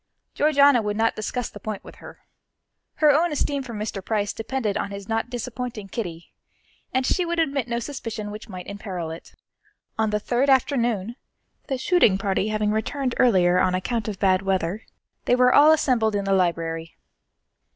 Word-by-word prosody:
Georgiana 285 -4 +4
would 210 -1 -2
not 225 0 +2
discuss 230 +2 -3
the - - -10
point 215 -2 -5
with - - -13
her. - - -13 0.7
Her 300 -1 +5
own 325 +4 +2
esteem 285 -1 -1
for 245 -4 -7
Mr. 210 -2 -4
Price 205 0 -1
depended 225 -2 -2
on - - -2
his 200 0 -8
not 225 +1 -1
disappointing 240 -4 -5
Kitty, 175 -6 -6 0.6
and 260 0 0
she 360 - +1
would 345 0 -2
admit 280 -6 0
no 235 -1 -2
suspicion 230 -5 -5
which 215 +2 -9
might 185 -2 -7
imperil 185 -5 -5
it. 165 - -11 0.6
On 220 -1 +2
the 210 0 0
third 245 +6 0
afternoon, 240 -5 +1 0.5
the 270 - -1
shooting 260 - +3
party 195 +1 0
having 215 -1 0
returned 250 +4 -1
earlier 180 -7 +4
on 185 0 +2
account 220 +4 -2
of 210 -3 -4
bad 190 -1 +3
weather, 190 +1 -2 0.4
they 245 - +4
were 250 0 +4
all 300 +2 +7
assembled 240 -8 +2
in 200 -1 -1
the 195 - +1
library. 165 -3 -1
220 Hz, 175 wpm, -24 LUFS, 195-255 Hz, 0.7 s, all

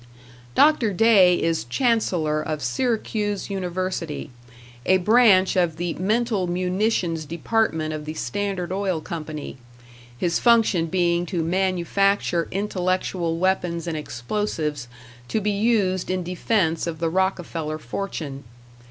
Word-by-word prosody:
Dr. 285 -9 +4
Day 190 -4 +5
is 165 -6 0
Chancellor 165 - +1
of 155 -2 -4
Syracuse 210 - -1
University, 180 -5 -3 0.5
a 190 - +4
branch 200 -1 +5
of 175 -4 +2
the 175 0 -2
Mental 210 0 0
Munitions 180 -1 0
Department 160 -1 -1
of 150 -1 -5
the 155 +1 -5
Standard 195 -1 -3
Oil 190 -3 -1
Company; 155 -4 -6 0.6
his 170 +4 0
function 225 -8 +3
being 175 0 +1
to 170 -3 -1
manufacture 185 0 +1
intellectual 185 -3 -1
weapons 175 -2 0
and 165 -2 -3
explosives 150 - -3 0.4
to 220 - 0
be 210 0 0
used 200 -3 +1
in 185 -1 -1
defense 175 -1 0
of 165 -1 -3
the 165 +1 -1
Rockefeller 170 -4 -1
fortune. 150 -1 -5
180 Hz, 115 wpm, -23 LUFS, 165-200 Hz, 0.6 s, Day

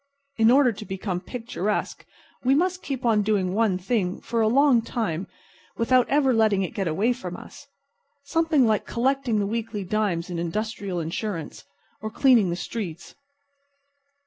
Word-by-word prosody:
In 225 0 +5
order 260 0 +5
to 215 - -8
become 190 -2 -4
picturesque 215 -1 -3 0.4
we 260 +2 +4
must 365 +3 +1
keep 265 -3 -4
on 220 -3 +4
doing 200 -3 0
one 210 -3 +2
thing 185 -1 -1
for 230 -1 -2
a 220 - +3
long 265 0 +4
time 200 -6 -3 0.5
without 250 +1 +3
ever 275 -2 +3
letting 215 -4 +3
it 180 - -4
get 195 -3 -2
away 200 +10 +1
from 250 - -7
us. - - -13 0.6
Something 310 -2 +2
like 215 -2 +1
collecting 255 -1 0
the 205 - +1
weekly 220 -1 -3
dimes 185 -3 -1
in 170 - -3
industrial 195 +1 -3
insurance. 165 0 -4 0.4
Or 215 - -4
cleaning 230 -4 +4
the 170 - -1
streets. 180 -3 -6
220 Hz, 155 wpm, -25 LUFS, 190-245 Hz, 0.6 s, In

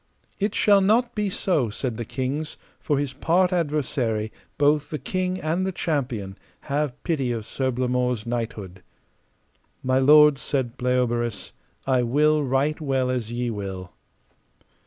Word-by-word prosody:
It 205 +1 -1
shall 200 -2 +5
not 230 +5 +2
be 210 -2 -1
so, 165 - 0
said 120 +2 -3
the 120 - -4
kings, 140 +6 -3 0.2
for 145 - 0
his 140 -1 -2
part 175 +6 +2
adversary, 135 -9 -1 0.3
both 145 0 +2
the 155 - -3
king 185 +3 -2
and 165 +4 -1
the 190 - -1
champion, 125 - -3 0.2
have 145 -2 -2
pity 140 -7 0
of 115 -3 -3
Sir 130 +3 -2
Blamore's 125 -2 0
knighthood. 110 -6 -4 1.0
My 130 0 +2
lords, 150 +1 +6
said 130 -4 -2
Bleoberis, 120 -4 -1 0.3
I 130 -2 +2
will 150 +5 +3
right 140 +4 0
well 135 -3 0
as 120 -3 -3
ye 120 0 -2
will. 95 -3 -6
135 Hz, 140 wpm, -24 LUFS, 120-155 Hz, 1.0 s, lords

